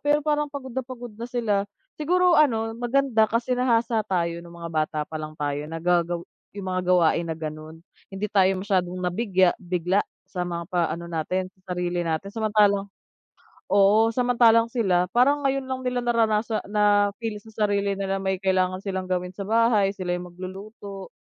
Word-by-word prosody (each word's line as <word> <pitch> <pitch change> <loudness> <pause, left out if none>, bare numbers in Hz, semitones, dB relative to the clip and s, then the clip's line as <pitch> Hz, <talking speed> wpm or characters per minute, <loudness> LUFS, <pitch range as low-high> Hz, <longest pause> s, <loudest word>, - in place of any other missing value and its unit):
pero 295 0 +2
parang 295 -1 +1
pagod 270 -3 -7
na 260 - -1
pagod 245 -2 -9
na 230 +3 -7
sila. 210 -5 0 0.3
Siguro 360 +3 +3
ano 225 -8 +3
maganda 240 -1 +2
kasi 235 +2 0
nahasa 235 -2 +2
tayo 170 -2 -1
nung 170 0 -13
mga 170 -1 -7
bata 155 0 -1
palang 155 0 -7
tayo, 145 0 -2
nagagawa 170 +1 0 0.3
yung 195 - -6
mga 185 0 -1
gawain 175 -2 +3
na 160 - -3
gano'n. 155 0 -7 0.3
Hindi 195 +2 -3
tayo 190 -2 +5 0.2
masyadong 185 -3 0
nabigya 185 0 +2
bigla 180 +2 0 0.2
sa 180 - -6
mga 170 -1 -4
pa 175 - +2
ano 170 +1 -5
natin, 175 +3 -2 0.2
sa 185 -1 -5
sarili 175 0 -1
natin. 165 +2 -2
Samantalang 210 -2 +2 0.8
oo, 210 +3 +5
samantalang 235 -2 +4
sila 185 -7 +1
parang 275 +4 +3
ngayon 275 -1 0
lang 260 0 -4
nila 250 -1 -1
naranasa 225 -2 +1
na-feel 210 +1 +1
sa 220 0 -3
sarili 200 -1 0
nila 195 0 -2
may 190 0 0
kailangan 185 -1 +1
silang 190 -1 -3
gawin 180 0 -2
sa 200 - -5
bahay, 225 -3 +3
sila 180 -2 -3
yung 180 0 -5
magluluto. 195 +2 -9
200 Hz, 165 wpm, -25 LUFS, 180-230 Hz, 0.8 s, tayo